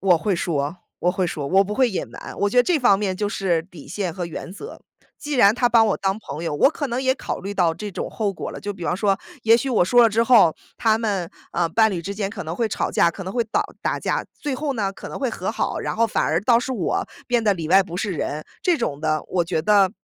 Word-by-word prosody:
我 180 -3 +4
会 200 +1 0
说 155 -1 -2 0.2
我 180 - +2
会 185 -1 0
说。 150 -4 -4
我 190 +5 +4
不 210 +2 -4
会 255 -1 +3
隐 190 - -3
瞒， - - -9
我 205 - +2
觉 250 - -4
得 245 - +7
这 340 +3 +2
方 240 -7 +4
面 195 -3 -1
就 205 +1 -1
是 180 -5 0
底 170 -4 -14
线 180 +2 -3
和 175 0 -4
原 170 +1 -7
则。 200 - -9 0.4
既 295 - -6
然 210 -3 +6
她 245 - +2
把 230 -2 +5
我 210 - +1
当 195 +2 -1
朋 160 -4 -7
友， 150 - -2
我 270 - +4
可 290 -2 -3
能 245 +2 -2
也 260 0 +2
考 - - -5
虑 200 +2 -5
到 175 -4 +2
这 205 +4 -6
种 - - -4
后 210 -3 -1
果 - - -6
了， - - -8
就 205 0 -4
比 175 -3 -8
方 175 - 0
说， 195 -1 +1 0.2
也 225 +1 +6
许 270 +3 -2
我 215 -7 +3
说 245 +6 +5
了 230 - +6
之 225 +2 +2
后， 225 -9 +5 0.2
他 220 -1 +2
们， 200 -6 -1 0.2
呃， 170 -1 +1
伴 220 +5 +3
侣 175 -4 -3
之 200 +3 -5
间 200 -1 -2
可 205 - -6
能 160 +1 -5
会 230 +1 0
吵 - - -2
架， 170 - +3
可 195 - -8
能 190 - -5
会 240 -1 +1
导 215 - 0 0.2
打 - - 0
架。 - - -1
最 290 -3 -3
后 285 +1 -2
呢， 200 -3 -1
可 - - -9
能 - - -6
会 265 -4 -1
和 - - -3
好， - - -2
然 - - -3
后 230 0 +3
反 - - 0
而 160 +2 +1
倒 235 0 +5
是 260 - -4
我 200 -9 -1 0.2
变 240 -2 +1
得 205 -2 +3
里 165 -3 -5
外 195 +2 +6
不 175 -1 -7
是 200 +1 -2
人 155 -2 -3 0.2
这 355 -2 +3
种 150 - -3
的。 155 -1 0
我 180 -2 +1
觉 165 -2 -1
得 200 -1 +4
200 Hz, 300 characters per minute, -22 LUFS, 175-230 Hz, 0.4 s, 得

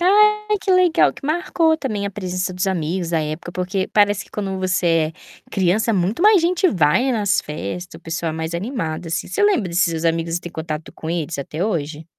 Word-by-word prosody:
Ai, 425 +3 +4
que 380 - +1
legal 365 -2 +4
que - - -13
marcou, 320 0 +1
também, 215 -9 -3
a 200 - -2
presença 185 -1 -3
dos 180 +2 -2
amigos, 175 -1 -1
a 165 - +2
época, 155 +3 -5
porque 185 +1 -2
parece 205 -1 +2
que - - -23
quando 195 -2 -3
você 170 -4 +1
é - - -20
criança 200 +5 +2
muito 190 - 0
mais 410 -3 +6
gente 360 +2 +2
vai 190 - +2
nas 205 -4 +2
festa, 150 - -6
o - - -15
pessoal 165 0 -3
mais 160 +1 -4
é - - +1
animado, 180 - -4
assim. 165 +1 -3
Você 415 - -3
lembra 315 - +2
desses 170 +1 +2
seus 165 -1 -2
amigos 165 0 0
e - - -3
tem 175 - -8
contato 160 -1 -5
com 160 - -8
eles 165 -2 -2
até 155 +5 -3
hoje? 160 -6 -3
185 Hz, 210 wpm, -21 LUFS, 165-235 Hz, -, mais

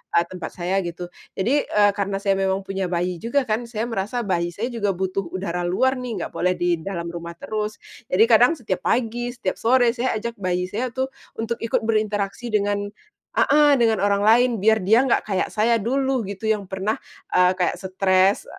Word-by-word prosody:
a - - +7
tempat 175 -1 -7
saya 185 +2 0
gitu, 175 0 -6 0.2
jadi, 250 +10 +1
eee, 205 -1 +4
karena 200 -1 -2
saya 195 -1 +2
memang 190 0 0
punya 195 -1 -3
bayi 175 0 -2
juga 245 +5 0
kan, 230 0 -2
saya 225 -1 -3
merasa 230 +1 -2
bayi 175 -4 0
saya 235 +4 -3
juga 205 -5 -1
butuh 190 0 -2
udara 180 -2 -3
luar 260 +8 +1
nih, 230 -8 -4
nggak - - -6
boleh 180 +1 +1
di 175 -1 0
dalam 170 -1 -5
rumah 170 0 -7
terus, 215 +3 -4 0.3
jadi 195 +5 +4
kadang 245 +8 +6
setiap 195 - -3
pagi 240 0 0
setiap 185 - -3
sore 245 0 +4
saya 250 0 -1
ajak 230 0 -5
bayi 180 -1 -1
saya 245 +5 -1
itu 260 +2 -2 0.3
untuk 230 +1 -3
ikut 230 -1 -1
berinteraksi 215 0 -1
dengan 205 -2 0 0.5
heeh, 290 -1 +5
dengan 225 -4 +2
orang 200 0 +2
lain 240 +3 +5
biar 220 +1 +3
dia 225 +8 +4
nggak 250 - +2
kayak 195 -3 -1
saya 230 +2 +3
dulu, 260 +1 0
gitu, 200 +2 -4
yang 210 -2 0
pernah, 190 +3 -2 0.4
eee, 180 0 +5
kayak 185 -1 0
stres 190 +1 +2
205 Hz, 190 wpm, -23 LUFS, 185-235 Hz, 0.5 s, a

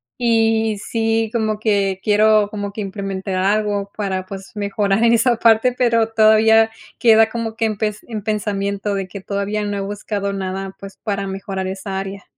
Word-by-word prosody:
y 225 -2 +2
sí, 225 +1 -1
como 215 -2 -1
que 200 -3 +1
quiero 215 0 +4
como 205 -2 -4
que 210 - -6
implementar 195 -1 -4
algo 200 +1 0
para 190 -3 -2
pues 195 +1 -9
mejorar 205 +1 0
en 235 - +5
esa 235 0 +3
parte, 225 +2 +4
pero 230 -3 +2
todavía 220 0 +5 0.3
queda 225 -1 +5
como 225 -1 -4
que 225 - 0
en 215 -2 -1
pes 210 0 -2
en 220 -3 -5
pensamiento 200 -1 -2
de 195 -1 -3
que 195 +1 -9
todavía 200 +2 -2
no 205 0 -2
he - - -2
buscado 200 0 -3
nada, 195 0 -4
pues 195 0 -10
para 200 -2 -2
mejorar 195 0 -4
esa 190 +1 -5
área. 195 +1 -5
205 Hz, 175 wpm, -19 LUFS, 195-220 Hz, 0.3 s, en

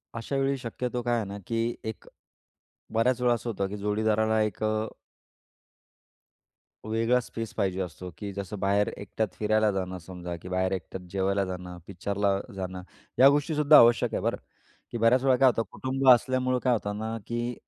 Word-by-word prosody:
अशावेळी 135 +4 -1
शक्यतो 125 0 -4
काय 120 0 0
आहे 110 - -2
ना 100 +1 -6
की 115 0 -1
एक 110 -1 -6 0.9
बऱ्याचवेळा 125 +1 +2
असं 120 0 -3
होतं 100 -3 -2
की 105 - -5
जोडीदारांना 110 +1 +1
एक 105 0 -2
अ 110 0 0 2.0
वेगळा 115 +3 +2
स्पेस 115 -2 -6
पाहिजे 95 -1 -1
असतो 90 0 -6
की 100 +1 -5
जसं 100 +1 -6
बाहेर 100 +1 +2
एकट्यात 105 +2 -2
फिरायला 110 0 +2
जाणं 95 -1 -3
समजा 90 0 -7
की 90 - -9
बाहेर 95 0 0
एकट्यात 90 0 -5
जेवायला 100 0 0
जाणं, 90 -1 -7
पिक्चरला 100 +1 -1 0.2
जाणं 95 -1 -5 0.4
या 135 +2 +9
गोष्टीसुद्धा 150 +1 +4
आवश्यक 120 0 +5
आहे - - -1
बरं. - - 0 0.5
की - - -3
बऱ्याच 115 +3 +4
वेळा 135 -1 +4
काय 135 - +5
होतं 115 -2 0
कुटुंब 135 +1 -2
असल्यामुळं 130 +1 +4
काय 125 - +3
होतं 105 -2 -2
ना 110 +1 -3
की 120 +1 -2
110 Hz, 165 wpm, -27 LUFS, 95-120 Hz, 2.0 s, या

